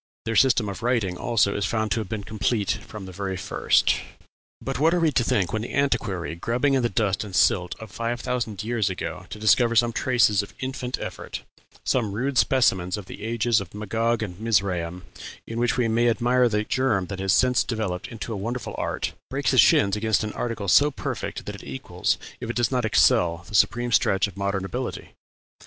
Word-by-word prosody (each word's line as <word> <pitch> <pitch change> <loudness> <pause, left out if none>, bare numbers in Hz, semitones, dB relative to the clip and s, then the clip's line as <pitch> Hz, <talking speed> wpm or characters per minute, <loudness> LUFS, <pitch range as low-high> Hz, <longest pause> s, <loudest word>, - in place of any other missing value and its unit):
Their 115 0 -2
system 115 -1 +4
of 100 - -6
writing, 115 -7 0
also, 105 0 +1
is 100 - 0
found 110 -2 -1
to 115 - +1
have 105 -4 -5
been 110 -2 -4
complete 105 0 -1
from 105 -3 -6
the 95 - -8
very 95 0 -4
first.... 95 +1 +2 0.6
"But - - -4
what 165 +4 +4
are - - +2
we 165 -2 +3
to 125 - +2
think 95 -6 0
when 110 - 0
the 115 - -5
antiquary, 105 -11 0
grubbing 120 +11 0
in 135 - +3
the 120 - +1
dust 100 -1 0
and 100 -3 -7
silt 90 -1 +2
of 110 -3 -10
five 115 +4 -3
thousand 120 -5 -3
years 115 -3 0
ago 95 - -5
to - - -7
discover 115 +2 +3
some 120 0 +3
traces 115 -6 +3
of 100 - -11
infant 130 -1 -3
effort - - -6 0.4
some 110 -6 0
rude 130 +5 0
specimens 95 -8 +2
of 105 - -7
the - - -10
ages 115 -1 +1
of 95 0 -10
Magog 115 +2 -1
and 90 -3 -7
Mizraim, 90 -6 0 0.4
in 115 +1 -5
which 120 +1 +1
we 120 -2 +2
may 115 +2 +2
admire 125 +1 +2
the 105 -1 0
germ 115 -6 0
that 95 0 -6
has 95 0 0
since 125 +4 +3
developed 105 -6 -3
into 115 0 -6
a - - -4
wonderful 120 +5 -4
art - - -2 0.2
breaks - - 0
his - - +7
shins 100 0 +4
against 110 -1 +1
an 105 - -4
article 115 -4 -3
so 145 +10 +5
perfect 140 - -5
that - - -5
it - - -10
equals 65 -1 -2 0.2
if 120 - -6
it 120 - -3
does 120 0 +1
not 125 -3 0
excel 85 -5 +3
the - - -12
supreme 120 +3 +2
stretch 100 -2 +3
of 100 - -11
modern 100 -1 -2
ability? 125 +5 -5
110 Hz, 210 wpm, -24 LUFS, 100-120 Hz, 0.6 s, his